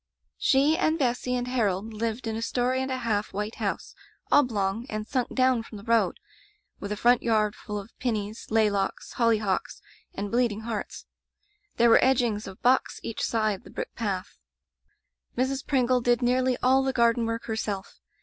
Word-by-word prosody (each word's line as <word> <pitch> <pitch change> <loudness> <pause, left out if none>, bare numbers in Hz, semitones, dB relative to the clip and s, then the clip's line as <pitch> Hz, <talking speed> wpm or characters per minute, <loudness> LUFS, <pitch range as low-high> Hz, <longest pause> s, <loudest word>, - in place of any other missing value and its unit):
''She 280 +4 +4
and 320 -3 +2
Bessy 250 -2 0
and 245 0 -2
Harold 220 -4 -1
lived 225 +2 -3
in 220 -1 -2
a 225 - -3
story 250 +2 0
and 265 - -3
a 260 - -1
half 220 -4 -1
white 210 +3 -4
house, - - -3 0.4
oblong, 230 -4 +2
and 215 0 -3
sunk 250 +1 -2
down 255 -2 +3
from 225 -1 -10
the 200 - -11
road, 230 0 +2 0.6
with 200 - -6
a 210 - -2
front 245 +3 +4
yard 215 -2 +1
full 210 -1 -6
of 205 +2 -8
*pineys,' 215 -3 -3
Maylocks,' 210 -3 0
hollyhocks, 220 -5 +1 0.4
and 200 +1 -4
bleeding 235 -3 +1
hearts. 225 -2 -5 0.7
There 235 - +5
were - - +6
edgings 240 -5 +2
of 190 -1 -11
box 255 +2 +2
each 230 - -5
side 215 -4 0
the - - -13
brick - - -6
path. 195 -5 -4 1.0
''Mrs. 265 +2 -1
Pringle 255 -2 +2
did 240 +1 +2
nearly 255 +1 +2
all 260 +1 +5
the 265 0 -1
garden 235 -1 +3
work 230 0 -3
herself. 210 -3 -4
230 Hz, 170 wpm, -27 LUFS, 210-250 Hz, 1.0 s, were